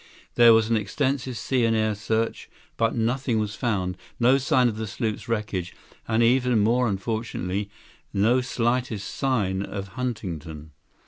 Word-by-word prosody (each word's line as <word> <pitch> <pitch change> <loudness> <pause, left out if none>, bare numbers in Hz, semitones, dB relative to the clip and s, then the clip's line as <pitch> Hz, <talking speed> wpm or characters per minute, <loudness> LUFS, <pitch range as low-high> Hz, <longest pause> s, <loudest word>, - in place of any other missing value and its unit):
There 120 -1 +7
was 110 -1 +3
an 115 - +2
extensive 130 +4 -1
sea 130 0 0
and 115 -1 +2
air 110 0 +1
search, 110 +2 -2 0.3
but 115 -1 +1
nothing 120 +1 0
was 105 -1 -1
found, 95 -6 -1 0.2
no 125 +3 +5
sign 130 -2 +3
of 110 -2 -2
the 110 0 -3
sloop's 110 +2 -3
wreckage, 105 -6 -2 0.3
and, 115 +1 +2
even 125 0 +3
more 120 +4 +3
unfortunately, 100 -2 -3 0.4
no 110 +6 +3
slightest 120 -3 -1
sign 105 -9 0
of 100 0 -5
Huntington." 85 - -5
115 Hz, 145 wpm, -25 LUFS, 100-125 Hz, 0.4 s, There